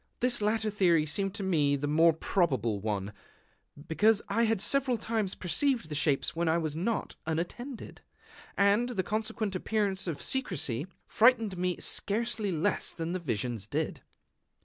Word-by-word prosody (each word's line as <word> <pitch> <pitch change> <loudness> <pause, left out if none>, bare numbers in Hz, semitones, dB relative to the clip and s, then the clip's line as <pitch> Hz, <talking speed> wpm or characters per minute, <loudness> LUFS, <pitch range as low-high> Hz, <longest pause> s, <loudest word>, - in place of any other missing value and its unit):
This 245 -2 +2
latter 215 +1 +1
theory 175 -6 +3
seemed 195 +6 -2
to 205 - -4
me 150 -7 +2
the 140 +1 -3
more 160 +3 +5
probable 135 - 0
one, 105 -1 -3 0.7
because 210 +6 +3
I 230 +4 +2
had 225 -2 +1
several 260 +3 +2
times 220 -4 -2
perceived 230 - 0
the - - -4
shapes 150 +2 +1
when 170 0 0
I 160 - +3
was 155 -3 -2
not 205 +7 -2
unattended; 200 - -4 0.6
and 205 +5 +3
the 200 -7 -1
consequent 215 0 -2
appearance 200 -1 -1
of 155 -4 -3
secrecy 170 - -1 0.2
frightened 225 -4 +3
me 180 0 -1
scarcely 215 -1 -1
less 175 +4 0
than 165 0 -4
the 185 - -2
visions 115 - -3
did. - - -2
185 Hz, 150 wpm, -30 LUFS, 155-220 Hz, 0.7 s, more